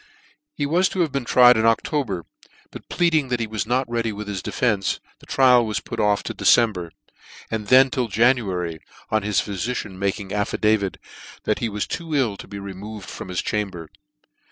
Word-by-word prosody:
He - - -1
was 175 +6 +2
to 185 - -1
have 160 -4 +1
been 140 -2 -2
tried 125 0 +6
in 110 - +2
O&ober, 115 - 0 0.5
but - - -11
pleading 160 -5 +2
that 125 -1 -1
he 115 - -1
was 110 -2 -4
not 125 +2 +1
ready 115 -1 -1
with 105 0 -7
his 100 -2 -4
defence, 105 -4 0 0.2
the - - -18
trial 125 -2 +5
was 110 -2 -2
put - - -7
off 105 -1 +2
to - - -4
December 105 -8 +3
j - - -34 0.6
and 110 -2 -3
then 130 +3 +6
till 130 -4 -1
January, 100 -7 +1 0.3
on 110 0 +2
his 105 -1 +1
phyficians 100 -1 -4
making 100 0 -2
affidavit 105 -1 0 0.5
that 110 +4 -1
ne 115 - 0
was 105 0 -2
too 165 -3 -4
ill 125 -8 +1
to - - -10
be 100 - -8
removed 100 +1 -8
from - - -7
his 90 - -2
chamber. 95 -6 -3
110 Hz, 190 wpm, -22 LUFS, 100-125 Hz, 0.6 s, tried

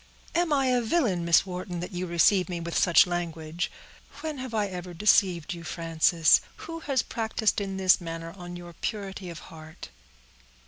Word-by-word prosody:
"Am 340 -1 +1
I 275 -2 +3
a 250 -1 +2
villain, 225 - +1
Miss 170 +2 +5
Wharton, 180 -1 -5
that 180 - -6
you 180 0 -4
receive 180 +3 +3
me 175 -1 -3
with 170 0 -5
such 180 +1 +6
language? 170 -1 -3 0.5
When 310 -3 -4
have 255 -1 -6
I 215 -2 0
ever 180 -2 -7
deceived 180 -3 +3
you, 170 -1 -9
Frances? 165 0 +3 0.2
Who 330 0 -6
has 275 -6 0
practiced 220 -2 -1
in 195 -1 -4
this 190 -1 +4
manner 165 0 -6
on 175 -2 -8
your 175 -1 -9
purity 195 -1 -5
of 170 - -8 0.2
heart?" 160 0 -11
180 Hz, 175 wpm, -27 LUFS, 170-215 Hz, 0.5 s, such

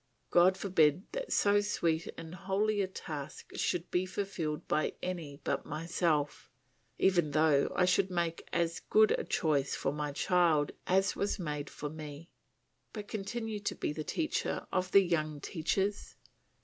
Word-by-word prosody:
God 180 +2 +5
forbid 180 -4 +3
that - - -4
so 205 0 +4
sweet 170 -5 0
and 165 0 -8
holy 200 +3 0
a 190 - 0
task 155 -5 -7
should 175 0 -1
be 180 +1 +1
fulfilled 185 -6 -3
by 155 - +1
any 165 -6 -4
but - - -1
myself, 155 -1 -1 0.5
even 175 -5 +3
though 150 -1 +3
I 180 - +4
should 190 +1 +3
make 170 -2 -2
as 170 -1 0
good 215 0 +4
a - - +1
choice 145 -4 +1
for 135 - -1
my 150 0 -2
child 165 -2 +2 0.2
as 195 +2 +3
was 200 - -1
made 150 -5 -4
for 150 - -6
me! 150 +1 -8 0.6
But 210 -2 -6
continue 215 +1 -4
to 205 - -3
be - - -2
the 155 - -4
teacher 315 - -2
of 185 0 0
the 200 - +7
young 155 -4 -1
teachers. 195 +6 -2
175 Hz, 155 wpm, -32 LUFS, 155-195 Hz, 0.6 s, the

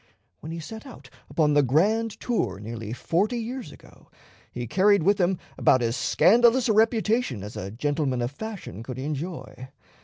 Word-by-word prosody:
When 160 - -8
he 165 - -5
set 220 - -9
out 260 - -13 0.2
upon 150 -2 +2
the 145 - +5
grand 205 - +1
tour 120 - -1
nearly 110 0 -6
forty 185 - 0
years 240 +2 -5
ago, - - -18 0.4
he 120 0 -5
carried 195 - +3
with 200 +4 +3
him 180 +1 +2 0.2
about 130 -2 +4
as 115 0 0
scandalous 235 - +4
a 220 - +3
reputation 220 - +1
as 105 - -8
a 95 - -5
gentleman 135 +2 -1
of 120 - -2
fashion 195 - -7
could 125 +2 -7
enjoy. 145 -1 -5
165 Hz, 165 wpm, -25 LUFS, -, 0.4 s, the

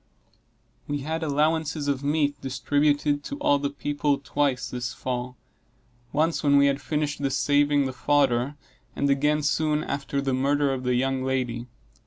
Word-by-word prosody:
We 145 -1 -2
had 160 +4 -3
allowances 155 0 0
of 140 -1 -1
meat 145 0 0
distributed 145 +2 +1
to 285 - -5
all 145 - +2
the 140 0 -1
people 145 0 -1
twice 140 -2 -1
this 125 0 -4
fall 125 0 -4 0.7
once 160 +2 +1
when 140 -1 +4
we 140 - +6
had 140 0 +1
finished 150 -1 -2
the 140 - +1
saving 145 +1 +2
the 130 - -3
fodder, 135 0 +1 0.4
and 140 0 +1
again 150 +2 +2
soon 150 +1 +1
after 140 0 -3
the 135 -1 -1
murder 140 +1 +1
of 130 -1 -5
the 125 0 +2
young 130 +1 0
lady. 125 -2 -2
145 Hz, 160 wpm, -25 LUFS, 135-145 Hz, 0.7 s, we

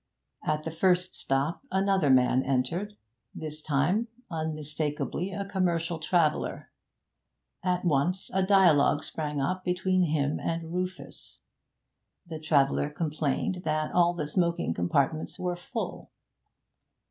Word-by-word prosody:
At 155 0 0
the 160 - -4
first 180 +2 +2
stop 135 +4 -1
another 190 -5 +2
man 130 0 +5
entered. 140 +11 -1 0.4
This 155 -1 -6
time, 155 - +1 0.2
unmistakably, 155 +2 -3
a 200 +1 -3
commercial 170 -4 0
traveller. 155 -1 0 0.9
At 180 0 0
once 170 +4 +1
a 190 - +2
dialogue 180 -7 +4
sprang 150 -2 -3
up 185 +7 -1
between 185 0 +1
him 150 -2 0
and 165 0 -3
Rufus. 185 +1 -5 0.9
The 160 -2 -7
traveller 145 -2 +2
complained 155 +4 -1
that 155 0 -1
all 175 0 +3
the 155 -3 -3
smoking 170 - 0
compartments 140 - 0
were 180 -1 -2
full. 225 +7 -5
165 Hz, 115 wpm, -28 LUFS, 150-180 Hz, 0.9 s, man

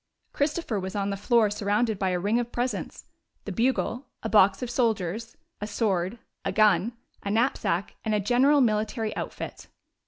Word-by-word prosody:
Christopher 285 - -1
was 190 +1 -5
on 200 0 0
the - - -1
floor 215 +1 +3
surrounded 210 +1 0
by 190 - +1
a 180 - 0
ring 205 +6 +1
of 240 0 -3
presents 245 +1 -3 0.2
— - - -46
the - - -4
bugle, 250 +1 0 0.2
a 220 - -2
box 200 0 +5
of 245 - -3
soldiers, 225 -2 -1 0.2
a 210 - -2
sword, 195 -2 0 0.3
a - - -1
gun, 210 0 +3 0.3
a 200 - -4
knapsack 210 -5 0
and 220 -1 0
a - - +2
general 255 +7 +4
military 220 -1 0
outfit. - - -6
215 Hz, 175 wpm, -27 LUFS, 200-240 Hz, 0.3 s, box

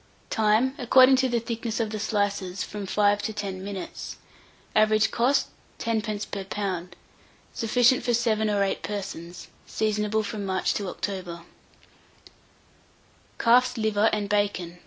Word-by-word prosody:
Time. 220 +4 +2
According 260 +2 +6
to 260 0 +2
the 240 -1 +1
thickness 230 0 -4
of 220 -2 -1
the 215 - -4
slices, 200 -3 -1
from 205 -2 -6
5 205 +1 +2
to 220 - -3
10 195 -3 -5
minutes. 195 -2 -6 0.6
Average 215 0 +4
cost, 250 +4 +2 0.3
10d. 215 -2 -2
per 195 - -3
lb. 190 -2 -3 0.6
Sufficient 245 +3 +3
for 245 - 0
7 220 -2 +1
or 200 -1 +2
8 195 - -1
persons. 180 -4 -6 0.2
Seasonable 215 0 0
from 210 0 -5
March 190 -1 0
to 200 - -3
October. 180 -4 -5 1.9
CALF'S 250 +1 +4
LIVER 220 -1 +2
AND 210 -1 -1
BACON. 200 -4 -1
210 Hz, 135 wpm, -26 LUFS, 200-225 Hz, 1.9 s, According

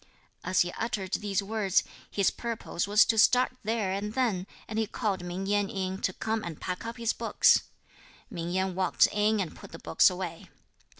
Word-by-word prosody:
As 185 0 +2
he 175 - 0
uttered 205 -4 -3
these 205 -1 0
words, 205 -2 +1 0.3
his 200 -2 +2
purpose 230 -6 -3
was 210 +1 +6
to 225 - +1
start 250 +3 +5
there 215 -3 -1
and 205 +3 -3
then, 215 -8 0 0.2
and 220 0 -3
he 220 - 0
called 200 -4 -2
Ming 180 +2 -4
Yen 205 0 +1
in, 190 0 -3
to - - +1
come 220 +3 -2
and 165 -3 -6
pack 180 +5 -4
up 230 - -6
his 230 -1 0
books. - - +4 0.7
Ming 170 -6 -5
Yen 190 +1 0
walked 185 -1 +3
in 210 +1 +2
and 185 -4 -3
put - - -12
the 165 - -8
books - - +4
away. 180 -3 -6
200 Hz, 190 wpm, -28 LUFS, 185-220 Hz, 0.7 s, was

